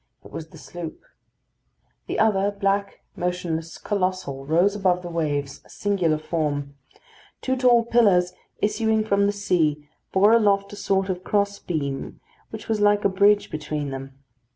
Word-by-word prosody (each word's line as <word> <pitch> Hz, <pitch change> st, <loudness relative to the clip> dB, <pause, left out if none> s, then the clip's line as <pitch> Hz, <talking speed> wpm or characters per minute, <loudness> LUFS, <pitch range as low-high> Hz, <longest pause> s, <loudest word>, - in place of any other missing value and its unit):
It -, -, -13 dB
was 160 Hz, -, -7 dB
the -, -, -14 dB
sloop. 175 Hz, -2 st, -8 dB, 1.1 s
The -, -, -3 dB
other, 200 Hz, -2 st, +3 dB
black, 200 Hz, 0 st, -1 dB
motionless, 170 Hz, -2 st, -3 dB
colossal, 185 Hz, -9 st, -2 dB
rose 175 Hz, +6 st, +3 dB
above 185 Hz, -3 st, +1 dB
the 175 Hz, -, -6 dB
waves, 145 Hz, -4 st, -2 dB
a -, -, -22 dB
singular 185 Hz, -6 st, 0 dB
form. 150 Hz, -3 st, -2 dB, 0.7 s
Two 260 Hz, -, -1 dB
tall 245 Hz, -2 st, +4 dB
pillars 200 Hz, -7 st, +3 dB, 0.3 s
issuing 220 Hz, +1 st, +1 dB
from 200 Hz, -1 st, +2 dB
the -, -, +2 dB
sea 160 Hz, -7 st, 0 dB, 0.2 s
bore 205 Hz, +3 st, +5 dB
aloft 200 Hz, -3 st, +3 dB
a -, -, -6 dB
sort 195 Hz, -1 st, 0 dB
of 185 Hz, -1 st, -3 dB
cross 200 Hz, 0 st, 0 dB
beam 140 Hz, -5 st, -4 dB, 0.3 s
which 220 Hz, -, -9 dB
was 220 Hz, -2 st, 0 dB
like 205 Hz, 0 st, +3 dB
a -, -, +5 dB
bridge 200 Hz, +2 st, +3 dB
between 150 Hz, -2 st, -4 dB
them. 135 Hz, 0 st, -8 dB
190 Hz, 155 wpm, -24 LUFS, 160-205 Hz, 1.1 s, bore